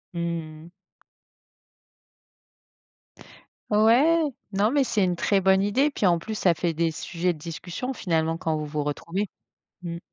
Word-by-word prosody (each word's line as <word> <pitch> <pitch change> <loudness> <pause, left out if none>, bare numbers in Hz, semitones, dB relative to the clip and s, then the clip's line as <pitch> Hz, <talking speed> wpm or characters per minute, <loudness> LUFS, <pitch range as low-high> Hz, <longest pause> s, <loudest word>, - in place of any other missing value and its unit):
Mmh - - -3 0.5
mh. - - -13 3.0
Ouais, 235 +11 +5 0.3
non 205 +4 +2
mais 285 -1 +3
c'est 210 -5 +1
une 180 - 0
très 195 +3 +2
bonne 190 0 +4
idée. 255 +9 +2
Puis 220 - -2
en 170 -2 +4
plus, 220 +5 -5
ça 180 -4 +3
fait 170 0 -1
des 165 +1 0
sujets 175 +2 -2
de 155 - -14
discussion 175 - -5
finalement 165 -6 0
quand 160 -1 -1
vous 150 - -3
vous 150 0 -3
retrouvez, 170 +7 -3 0.5
mmh. 170 -1 -5
180 Hz, 150 wpm, -25 LUFS, 165-215 Hz, 3.0 s, Ouais